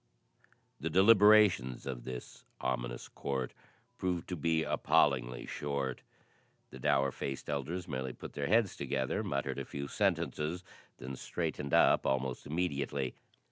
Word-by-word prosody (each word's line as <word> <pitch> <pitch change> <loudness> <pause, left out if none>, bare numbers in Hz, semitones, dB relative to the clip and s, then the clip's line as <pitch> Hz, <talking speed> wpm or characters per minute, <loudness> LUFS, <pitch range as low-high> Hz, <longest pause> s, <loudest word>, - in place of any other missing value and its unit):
The 80 +4 -2
deliberations 100 - +5
of 60 -3 -5
this 65 -1 -7 0.2
ominous - - -3
court 65 -2 -3 0.5
proved 90 -2 -1
to 90 - -2
be 80 0 +1
appallingly 60 -7 +2
short. 70 -3 -3 0.7
The 65 - -10
dour 70 +1 +2
faced 70 +1 -5
elders 80 +6 -3
merely 65 -4 -3
put - - -9
their 70 - -2
heads 110 -1 +3
together, 65 -2 -1
muttered 70 0 -2
a - - -2
few 70 0 -5
sentences, 80 +5 0 0.3
then 65 +1 -6
straightened 70 +2 -2
up - - +5
almost 65 -1 -1
immediately. 70 -5 -1
70 Hz, 130 wpm, -33 LUFS, 65-85 Hz, 0.7 s, deliberations